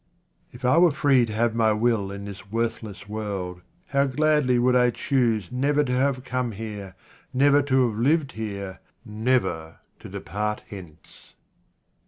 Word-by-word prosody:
If 120 +1 -8
I 130 +7 +5
were 175 0 +6
free 140 -5 +3
to 110 - -6
have 115 +1 +1
my 110 -1 +3
will 110 -2 +1
in 100 0 -7
this 100 -1 -10
worthless 115 -3 -3
world, 100 -4 -4 0.3
how 140 0 +2
gladly 145 -2 +2
would 125 +1 +3
I 125 -1 +5
choose 115 -6 0
never 145 +4 +2
to 125 -3 -2
have 130 0 +1
come 125 -3 -2
here, 105 -3 -7 0.4
never 140 +2 +5
to 130 -2 +2
have 110 -1 -4
lived 145 +3 +2
here, 100 -4 -6 0.3
never 105 -8 -1 0.2
to - - -10
depart 105 +6 -4
hence 90 -6 -13
115 Hz, 155 wpm, -25 LUFS, 105-130 Hz, 0.4 s, were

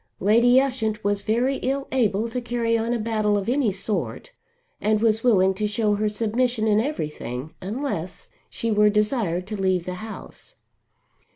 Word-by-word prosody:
Lady 235 +5 +5
Ushant 235 -5 -1
was 205 0 0
very 245 +6 +1
ill 275 +1 -2
able 225 -4 +1
to 250 +2 -4
carry 235 -1 0
on 230 +1 0
a 240 - +1
battle 215 -2 0
of 200 - -3
any 250 -3 +2
sort 205 - -3 0.5
and 215 0 +2
was 225 0 +2
willing 190 -6 +4
to 210 +3 -1
show 210 0 +1
her 210 +1 0
submission 225 +2 0
in 210 -1 +3
everything, 150 - -4
unless 195 - -4 0.2
she 230 - -3
were 210 0 +5
desired 210 -4 0
to 215 +2 -5
leave 185 -2 +1
the 180 - -4
house. 220 0 -9
215 Hz, 165 wpm, -24 LUFS, 205-240 Hz, 0.5 s, Lady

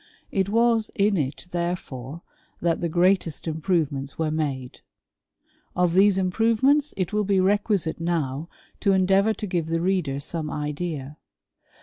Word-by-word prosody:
It 195 0 0
was 230 0 +2
in 200 0 +3
it, 145 -3 -2
therefore, 170 -4 -4 0.4
tl^t 170 -1 0
the 170 - 0
greatest 175 -1 +1
improyements 155 -4 -1
were 160 -1 0
made: 140 -5 -3 0.9
of 180 -2 +2
these 195 +1 +5
improvements 230 +10 +2
it 185 +2 -2
will 210 0 +2
be 195 -1 +2
requisite 195 -3 +1
now 160 -2 -2 0.3
to 200 -2 +3
endeavouj 195 +3 +3
to 215 - -5
give 175 -5 -1
the 165 0 0
reader 170 -6 0
some 155 +1 -3
idea. 150 -1 -4
175 Hz, 135 wpm, -24 LUFS, 155-195 Hz, 0.9 s, these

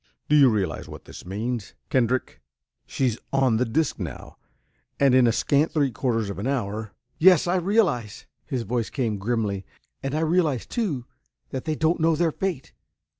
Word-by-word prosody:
"Do 150 - +3
you 140 -3 +7
realize 100 -7 -2
what - - -10
this - - -11
means, 110 +2 -4 0.2
Kendrick? 130 0 0 0.5
She's 125 -4 -1
on 130 -4 +3
the 125 - +2
disc 135 +6 0
now - - -7 0.6
and 140 -2 +5
in 130 -2 +6
a - - +4
scant 145 +6 +1
three 145 -5 +2
quarters 115 -4 -1
of 100 - -7
an 105 - -2
hour...." 110 -5 -2 0.3
"Yes, 180 -1 +6
I 175 +1 +1
realize!" 175 - 0 0.2
his 130 -6 -3
voice 115 +1 -2
came 115 -7 -2
grimly. 105 -2 -1 0.4
"And 135 +2 -3
I 155 - 0
realize, 160 -5 +1
too, 170 - -2 0.5
that 130 - -4
they 155 - -1
don't 160 +3 +1
know 165 0 +4
their 165 +1 +1
fate. 175 -6 -4
130 Hz, 175 wpm, -25 LUFS, 115-155 Hz, 0.6 s, you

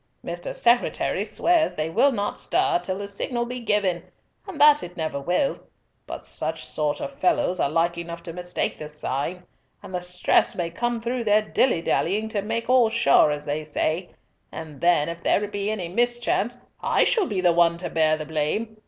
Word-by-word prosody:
Mr. 175 0 -5
Secretary 240 0 +1
swears 340 -2 +1
they 155 0 -1
will 255 +9 +4
not 205 -5 -3
stir 370 0 +1
till 185 0 -3
the 200 0 -5
signal 240 +4 -2
be 250 +1 -5
given, 205 -6 +1 0.5
and 365 -6 -8
that 295 0 +7
it 180 +1 -9
never 155 -3 -2
will; 180 - 0 0.5
but - - -7
such - - -2
sort 150 -1 -1
of - - -5
fellows 290 - +1
are - - +1
like 170 +2 0
enough 170 0 -7
to 170 - -6
mistake 180 0 -3
the 150 - -6
sign, 150 +4 -3 0.4
and - - -10
the 180 - -2
stress 180 0 +2
may 170 -2 -3
come 240 +6 -2
through 240 +1 -2
their 210 -1 +3
dillydallying 210 -1 +1
to 215 -2 -2
make 230 +3 -3
all 250 -2 +4
sure 150 -8 +4
as 145 0 -3
they 150 +1 -2
say, 155 +3 -2 0.4
and 155 -3 -9
then, 170 -4 +3
if 170 0 -6
there 205 +4 +1
be 205 0 -3
any 205 -5 -3
mischance, 240 +3 0 0.2
I - - +3
shall 445 -6 +2
be 205 -6 -2
the 175 -2 +3
one 170 0 +3
to 175 - -5
bear 155 -1 +2
the 155 - -6
blame. 160 +9 -2
185 Hz, 190 wpm, -24 LUFS, 165-235 Hz, 0.5 s, that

